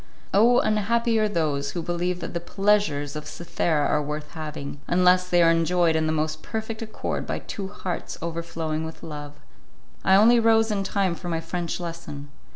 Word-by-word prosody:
Oh! 230 +5 +6
unhappy 225 +2 +1
are 215 -1 +2
those 145 -6 -1
who 170 - -3
believe 175 +1 -2
that 165 - -5
the 170 - -1
pleasures 195 -7 +1
of 150 0 -6
Cythera 160 -2 -1
are 150 - +2
worth 150 +1 -5
having, 150 -3 -6
unless 180 +1 +4
they 175 -1 +5
are 165 - +6
enjoyed 165 0 +2
in 160 0 +1
the - - +1
most 155 0 -1
perfect 220 0 -5
accord 220 -1 -4
by - - -2
two 195 -2 -6
hearts 190 -3 -5
overflowing 165 -1 -3
with 160 0 -8
love! 145 -2 -7 0.7
I 190 - +5
only 230 +4 +6
rose 225 -1 +4
in 200 -2 0
time 195 -2 0
for 175 +1 -6
my 165 -1 0
French 170 +1 -3
lesson. 165 -4 -7
170 Hz, 180 wpm, -25 LUFS, 155-200 Hz, 0.7 s, Oh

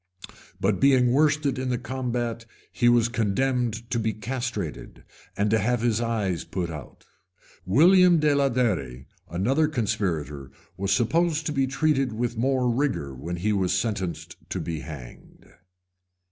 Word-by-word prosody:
But 100 0 +1
being 130 -3 +4
worsted 145 -1 +2
in 130 0 -2
the 125 - 0
combat, 120 -3 -3 0.2
he 120 -1 +3
was 120 -1 +4
condemned 120 +1 -1
to 120 - +1
be 110 -1 -1
castrated, 115 - -5 0.3
and 105 +1 +1
to 110 - +3
have 120 +3 0
his 115 -1 +1
eyes 105 -7 -1
put 90 -3 -4
out. 75 -5 -10 0.6
William 175 - +6
de 150 -1 +3
Alderi, 110 - 0 0.2
another 130 - +1
conspirator, 85 - -2 0.3
was 95 +1 -2
supposed 160 - +1
to - - -1
be 135 -2 +1
treated 135 -2 +1
with 120 +1 -2
more 130 +2 +1
rigor 120 - -1
when 85 +7 -5
he 105 +5 0
was 95 -3 +1
sentenced 95 -7 -3
to - - -3
be 80 -2 -4
hanged. 65 -4 -11
120 Hz, 145 wpm, -25 LUFS, 95-130 Hz, 0.6 s, William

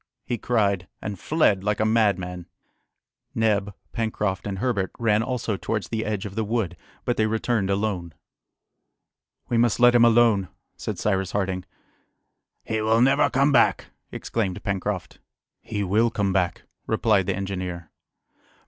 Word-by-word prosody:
he 120 - -1
cried, 100 -6 0
and 100 -3 -5
fled 105 - +2
like 105 0 0
a 110 - +2
madman. 100 -6 +1 0.9
Neb, 105 -3 +1 0.2
Pencroft, 105 -4 -2
and 100 -1 -3
Herbert 100 -4 0
ran 110 -2 +2
also 115 -4 -2
towards 105 0 -3
the 110 -1 -2
edge 105 -1 -2
of 100 - -6
the 110 +2 -1
wood 105 -5 -1 0.3
but 120 - 0
they 110 - +2
returned 110 -2 0
alone. 95 -5 -2 1.3
"We 120 - +1
must 120 -1 +2
let 120 0 +7
him 120 -1 +6
alone!" 115 -5 +4 0.3
said - - -5
Cyrus 95 -3 -1
Harding. 95 -2 -1 1.0
"He 110 -1 -2
will 110 +1 +3
never 135 +3 +4
come 140 +3 +3
back!" 120 -4 +3 0.2
exclaimed 100 -6 -3
Pencroft. 100 -2 -3 0.4
"He 105 -2 -3
will 110 +5 +2
come 100 -4 -1
back," 90 -2 0 0.2
replied 110 -4 +2
the 100 - 0
engineer. 90 -3 -5
105 Hz, 145 wpm, -24 LUFS, 95-115 Hz, 1.3 s, let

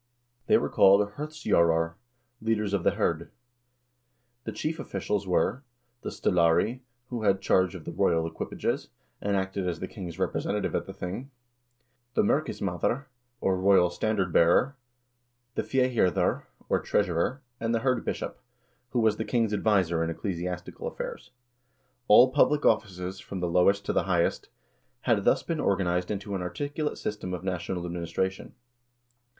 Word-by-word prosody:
They - - +6
were - - 0
called 100 +1 +5
hirdstjorar 85 - +1 0.5
(leaders 105 -2 0
of 100 -4 0
the - - +2
hird). 85 0 -1 1.2
The 110 - -3
chief 155 +9 -3
officials 100 -5 -2
were: 110 +8 +1 0.4
the - - -4
stallari, 85 +7 +2 0.3
who 120 -2 -3
had 100 -2 +3
charge 95 -2 +2
of - - -9
the - - -4
royal 80 -1 +2
equipages, 80 - -3 0.3
and 100 0 0
acted 95 -1 -1
as 85 -2 -4
the 95 - -4
king's 90 -6 -8
representative - - -1
at - - -1
the - - -7
thing; 100 +10 -6 0.9
the - - +4
merkismadr, 120 - 0 0.4
or 95 -1 +1
royal 95 -2 +4
standard 95 -3 -1
bearer, 90 +12 +4 0.8
the - - 0
fehirdir, 125 - +1 0.2
or - - +2
treasurer, 100 - 0 0.2
and 115 +1 0
the 115 - 0
hirdbishop, 130 -1 -1 0.6
who 125 - +2
was 110 -2 +3
the 110 - -1
king's 115 -3 0
adviser 95 -6 +2
in 80 - -1
ecclesiastical 90 0 -4
affairs. - - -6 0.8
All 125 +5 +8
public 150 +1 +3
offices, 95 -2 0
from 95 -1 -6
the 90 - -1
lowest 100 +4 +3
to - - -1
the - - +1
highest, 85 -2 +1 0.5
had - - +1
thus - - +3
been 165 -2 -2
or 100 - +2
ganized 90 -1 0
into 100 0 -4
an 95 - -2
articulate 145 - -3
system 95 -3 -4
of 90 - -8
national 90 -1 -3
administration. 90 +2 -3
95 Hz, 145 wpm, -28 LUFS, 90-110 Hz, 1.2 s, All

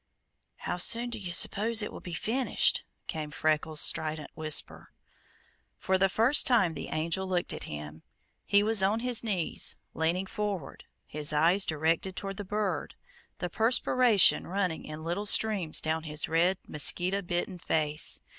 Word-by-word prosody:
"How - - -4
soon 235 +7 +2
do 230 - -5
you 185 -3 -5
s'pose 220 +5 +3
it - - -5
will - - -8
be 175 -2 -7
finished?" 245 +8 +1 0.2
came 155 -1 -5
Freckles' 155 +1 -1
strident 155 -2 -1
whisper. 155 -1 -1 0.8
For 190 0 0
the 195 +1 +3
first 230 +9 +4
time 220 -10 +3
the - - -7
Angel 170 +4 -2
looked 180 -2 0
at - - -4
him. 75 +1 -8 0.4
He 200 0 +3
was 220 -1 +3
on 205 +4 +1
his 245 -2 +1
knees, 195 -7 -1 0.2
leaning 170 +4 -1
forward, 200 -7 -5 0.2
his 150 0 -3
eyes 170 +6 +3
directed 165 +4 0
toward 195 -1 -5
the 205 - -4
bird, 205 0 -3 0.4
the 180 - -3
perspiration 225 +1 +3
running 185 -3 -2
in 155 +1 -8
little 175 +6 -3
streams 205 -7 +2
down 160 +1 -1
his 150 -1 -3
red, 175 +4 +2
mosquito 180 +6 0
bitten 175 0 -3
face. 150 -2 0
180 Hz, 155 wpm, -29 LUFS, 160-205 Hz, 0.8 s, first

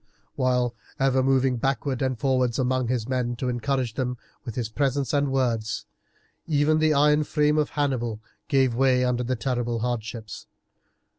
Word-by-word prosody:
While 125 -2 +1 0.3
ever 135 -1 +3
moving 130 -1 +2
backwards 135 +1 -1
and 130 -2 0
forwards 130 -4 +1
among 130 -1 +1
his 120 -2 -1
men 125 -2 -1
to 125 +2 -2
encourage 125 0 -1
them 125 +1 -2 0.3
with 115 - -6
his 120 -3 -2
presence 135 +2 -1
and 140 -1 +2
words, 115 -5 -1 0.6
even 155 0 +3
the 155 0 +3
iron 150 +1 +4
frame 150 0 +2
of 150 - +1
Hannibal 125 -7 -1 0.3
gave 135 -4 +3
way 125 0 +3
under 125 -1 0
the 130 +1 -1
terrible 120 -1 -2
hardships. 115 -2 -4
130 Hz, 155 wpm, -25 LUFS, 120-135 Hz, 0.6 s, iron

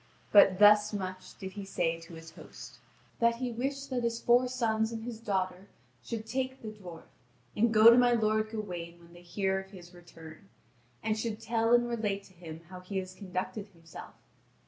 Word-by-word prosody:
But 195 -3 +7
thus 210 +1 +6
much 185 -2 -6
did 190 -2 -7
he 200 +1 -7
say 170 -4 -1
to 165 0 -12
his 165 0 -11
host: - - -12 0.4
that 235 0 +3
he 250 +1 -3
wished 275 +4 -4
that 250 -1 -1
his 230 0 -1
four 245 +2 +4
sons 225 -3 0
and 225 -1 -6
his 230 -2 -6
daughter 190 -3 -2 0.4
should 220 - -5
take 260 +2 -3
the 220 - -5
dwarf 185 -6 -11 0.5
and 230 +2 +2
go 220 +1 +8
to 235 - +6
my 245 -1 +4
lord 215 -1 +1
Gawain 175 -6 -6
when 170 0 -18
they 175 - -14
hear 190 +2 -1
of 190 0 -10
his 180 -2 -13
return, 170 +1 -14 0.5
and 215 -1 0
should 220 -1 -3
tell 230 0 0
and 240 0 +5
relate 210 -4 -2
to 190 - -19
him 165 -2 -10
how 185 -1 -9
he 185 +2 -6
has 185 -1 -4
conducted 185 +1 -5
himself. 165 -4 -13
205 Hz, 190 wpm, -30 LUFS, 185-230 Hz, 0.5 s, go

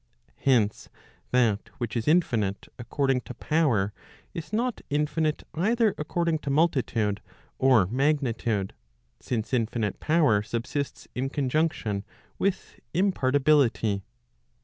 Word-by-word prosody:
Hence, 115 -6 +1 0.4
that 115 -5 +2
which 120 -2 -4
is 115 -1 -2
infinite 115 - +1
according 130 +2 0
to - - -9
power, 125 -11 +1 0.4
is 165 +2 -6
not 235 +2 -1
infinite 150 +1 0
either 220 +6 +2
according 165 +1 -1
to 145 - -5
multitude 125 -9 +1 0.4
or 130 -7 +5
magnitude, 120 -4 0 0.5
since 115 0 -3
infinite 115 -3 0
power 150 -10 +3
subsists 120 +6 -4
in 130 +2 -2
conjunction 135 -7 0 0.4
with 195 -1 -2 0.2
imparti¬ 145 -8 +2
bility. 120 -8 +3
135 Hz, 105 wpm, -27 LUFS, 115-155 Hz, 0.5 s, or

